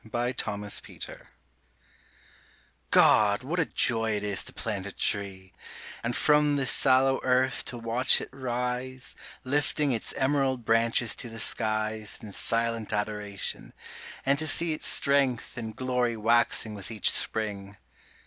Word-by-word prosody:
GO 120 +3 -2
PLANT 105 -4 -3
A 105 - -3
TREE - - -7 1.7
God, 105 +1 +5
what 165 +7 -2
a 165 - +3
joy 115 -6 0
it 105 - -3
is 100 -6 -1
to - - -9
plant 100 -4 -4
a - - -6
tree, 95 -1 -2 0.5
And 120 +1 -1
from 150 -1 +3
the 140 -1 0
sallow 135 +1 +3
earth 130 0 +1
to 125 - -5
watch 115 +3 +3
it - - -6
rise, 125 0 -4 0.3
Lifting 145 +1 0
its 115 -3 -1
emerald 135 -3 0
branches 115 +1 +2
to 120 - -3
the 115 - -9
skies 110 -1 -1
In 105 - -10
silent 115 +1 0
adoration; 105 -1 -4 0.5
and 140 +1 +2
to 155 - +1
see 165 +1 +4
Its 155 - -1
strength 140 -4 +1
and 110 -3 -6
glory 125 -2 -1
waxing 115 0 +2
with 100 -2 -7
each 110 -3 +1
spring. 100 -2 -3
115 Hz, 145 wpm, -27 LUFS, 110-130 Hz, 1.7 s, God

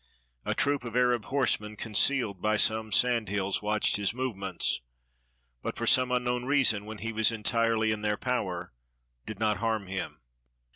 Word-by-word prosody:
A - - -1
troop 145 -2 +1
of 120 -1 -7
Arab 125 -3 +2
horsemen, 115 -6 0
concealed 105 -2 +1
by 110 0 +1
some 110 0 +1
sand 120 -1 +2
hills, 100 -1 -1
watched 105 0 +1
his 105 +2 -1
movements, 100 - -2 0.8
but - - -5
for - - -2
some 130 -1 +4
unknown 125 0 0
reason, 130 -7 +2
when 110 0 -7
he 115 +2 -5
was 110 +1 +3
entirely 115 0 +1
in 110 -1 -3
their 105 0 0
power, 95 - -3 0.5
did 110 -2 -6
not 110 -1 +1
harm 110 -3 -1
him. 95 0 -5
110 Hz, 160 wpm, -28 LUFS, 105-125 Hz, 0.8 s, some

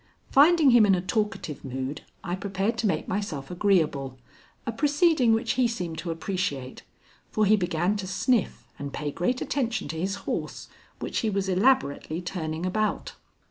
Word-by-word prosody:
Finding 300 0 +6
him 240 -2 +7
in 195 - +5
a 180 - -1
talkative 210 - -2
mood, 130 +2 -4 0.2
I 175 - -3
prepared 195 +3 -1
to 230 - +1
make 160 -6 -1
myself 180 -9 -3
agreeable, 160 -9 +1 0.5
a - - -1
proceeding 290 0 +3
which 225 +1 +1
he 255 -2 +2
seemed 180 -8 -4
to 175 - -5
appreciate, 165 -6 -3 0.5
for 215 - +1
he 210 +2 +6
began 175 0 0
to 195 -2 -5
sniff 195 - 0
and 140 0 -5
pay 150 -1 -3
great 245 - -1
attention 245 - -1
to 160 +1 -4
his 195 +3 -1
horse, - - -4 0.3
which - - -3
he 220 - 0
was 195 -1 -1
elaborately 185 - +2
turning 170 -2 -4
about. 215 +3 -1
195 Hz, 165 wpm, -26 LUFS, 160-225 Hz, 0.5 s, him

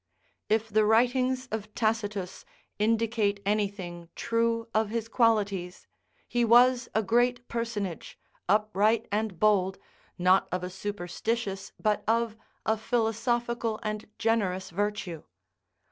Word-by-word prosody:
If 220 +1 +2
the 215 +1 +3
writings 250 +4 +2
of 215 -1 -5
Tacitus 210 -4 -1 0.4
indicate 220 -1 +1
anything 195 -5 -2
true 230 0 0
of 220 -1 +2
his 225 0 -2
qualities, 205 -6 +1 0.4
he 240 -1 +1
was 245 +2 +5
a 220 - +3
great 240 +3 +1
personage, 220 -7 -4 0.3
upright 215 +2 +2
and 210 -4 -1
bold, 195 -3 +3 0.4
not 185 +1 +4
of 180 0 -2
a 180 - -4
superstitious 195 +1 -3
but 210 -1 +1
of 230 0 +1 0.3
a 220 0 +2
philosophical 230 0 0
and 215 0 -4
generous 195 -6 0
virtue. 195 -4 -2
215 Hz, 115 wpm, -28 LUFS, 200-230 Hz, 0.4 s, was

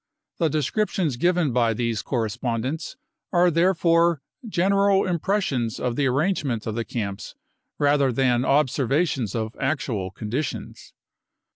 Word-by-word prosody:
The 165 -3 +2
descriptions 155 - 0
given 175 0 +1
by 115 -2 +2
these 115 -2 -1
correspondents 120 - -3 0.3
are 175 0 +4
therefore 170 -2 +3 0.2
general 195 0 +2
impressions 170 - -1
of 125 -2 -1
the 140 +1 +1
arrangement 135 - 0
of 110 - -2
the 115 +1 -2
camps 105 -2 -5 0.4
rather 145 -2 +3
than 125 0 +2
observations 135 - +1
of 110 0 -3
actual 130 -9 -1
conditions. 115 +9 -5
135 Hz, 115 wpm, -24 LUFS, 120-170 Hz, 0.4 s, are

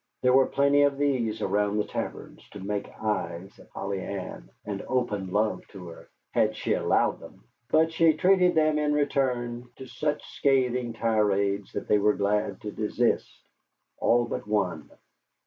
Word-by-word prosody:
There 125 0 +4
were 130 0 +5
plenty 140 +1 +3
of 140 -1 +3
these 120 -7 0
around 105 +1 +1
the 105 - +2
taverns - - -7
to 105 - -8
make 100 +1 -3
eyes 95 -4 -3
at - - -17
Polly 100 -1 -4
Ann 95 -2 -6 0.2
and 100 -2 -4
open 105 -7 -1
love 105 +2 +1
to 90 -4 -10
her, 85 - -13 0.2
had - - +2
she - - -1
allowed - - +1
them; - - -14 0.3
but 160 +1 +3
she 165 -1 +4
treated 180 +2 +3
them 155 -1 +3
in 150 0 +1
return 125 -4 -1
to 130 - -9
such 150 +4 -2
scathing 125 -3 +1
tirades 100 -3 0
that 100 - -4
they 105 - +4
were 105 +1 +3
glad 100 -1 -1
to 105 - -5
desist 110 +3 0 0.7
all 120 0 +3
but - - -5
one. 90 -7 -1
115 Hz, 165 wpm, -27 LUFS, 100-140 Hz, 0.7 s, were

